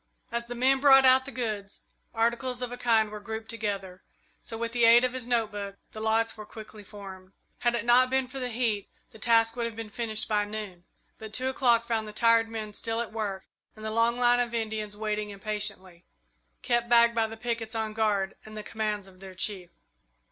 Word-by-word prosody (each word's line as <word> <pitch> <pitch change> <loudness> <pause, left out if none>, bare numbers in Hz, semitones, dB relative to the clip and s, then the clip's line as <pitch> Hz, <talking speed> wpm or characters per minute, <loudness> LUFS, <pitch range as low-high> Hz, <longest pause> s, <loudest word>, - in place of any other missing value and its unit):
As 235 0 -3
the 245 - -5
men 265 +2 +3
brought 270 -1 +7
out 260 0 +6
the 275 - -7
goods, 215 -6 -4 0.3
articles 240 +2 0
of 245 - -4
a - - -4
kind 225 -3 +2
were 210 - -6
grouped 220 +2 -6
together, 200 -5 -4 0.4
so, 225 - -6
with 230 0 -3
the 240 0 0
aid 230 +1 +8
of 255 0 0
his 255 -2 -6
note 230 -3 +1
book, 200 -1 -6 0.2
the 215 - -8
lots 225 +1 +1
were 215 - -8
quickly 215 0 -11
formed. 190 -2 -11 0.3
Had 240 -1 +1
it 230 -1 -2
not 250 +2 +5
been 265 0 +1
for 270 +2 -7
the 250 -1 -2
heat, 225 -4 -1 0.2
the 220 - -14
task 225 0 +3
would 235 -1 -1
have 230 - -8
been 225 -1 -7
finished 220 -1 -1
by 210 -1 +2
noon; 205 -4 -7 0.3
but 220 -1 -9
two 255 +2 0
o'clock 240 -3 +3
found 225 -2 -1
the 210 - -8
tired 230 0 +4
men 215 -2 -5
still 225 +2 -2
at 235 -2 -4
work 200 -4 -3 0.3
and 215 0 -10
the 220 - -2
long 230 +2 +2
line 245 0 +4
of 240 -1 -1
Indians 215 -2 -3
waiting 210 -1 -2
impatiently, 200 -3 -4 0.6
kept 240 -1 +1
back 235 0 +6
by 225 -1 +1
the 225 0 -9
pickets 230 -1 -3
on 220 -1 -2
guard 210 -3 +1
and 215 0 -10
the 215 - -5
commands 210 -3 -3
of 185 -1 -17
their 190 -1 -11
chief. 185 -2 -2
225 Hz, 215 wpm, -28 LUFS, 210-235 Hz, 0.6 s, aid